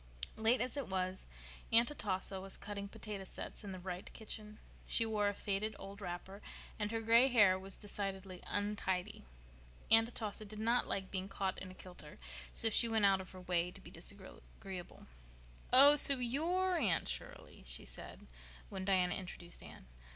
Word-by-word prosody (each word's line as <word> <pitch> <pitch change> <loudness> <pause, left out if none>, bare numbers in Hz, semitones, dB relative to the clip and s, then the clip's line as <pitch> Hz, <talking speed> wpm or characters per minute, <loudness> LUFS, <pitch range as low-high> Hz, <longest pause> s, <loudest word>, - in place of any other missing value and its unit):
Late 225 +3 +3
as 255 +3 -2
it 275 - -2
was 185 0 -2 0.4
Aunt 235 +4 +5
Atossa 190 -6 -3
was 195 0 -4
cutting 200 -1 -6
potato 205 -1 -7
sets 190 - -7
in 200 - -6
the 185 - -6
Wright 180 0 -6
kitchen. 215 -1 -8 0.3
She 230 - +2
wore 210 -2 +1
a 205 - +1
faded 205 +2 -2
old 200 +1 -9
wrapper, 190 +2 -6 0.4
and 210 -1 -1
her 225 0 -2
gray 230 +3 +6
hair 205 -7 +5
was 195 0 -5
decidedly 195 -2 -4
untidy. 205 -3 -2 0.7
Aunt 225 +1 +6
Atossa 215 -3 -3
did 215 0 -8
not 230 +3 +1
like 190 -1 -3
being 190 0 -3
"caught 195 -1 -2
in 185 - -8
a 185 - -11
kilter," 180 -5 -11 0.3
so 225 - +5
she 230 +2 +5
went 220 -2 +3
out 195 -1 +4
of 185 - -11
her 185 - -11
way 180 -1 0
to - - -12
be - - -13
disagreeable. 175 - -9 0.7
"Oh, 280 +3 +11
so 280 -1 +7
you're 340 +9 0
Anne 200 - +1
Shirley?" - - -6
she - - -1
said, - - -7 0.4
when 190 -1 -5
Diana 185 -2 +3
introduced 175 -2 -5
Anne. - - -12
200 Hz, 175 wpm, -36 LUFS, 185-225 Hz, 0.7 s, Oh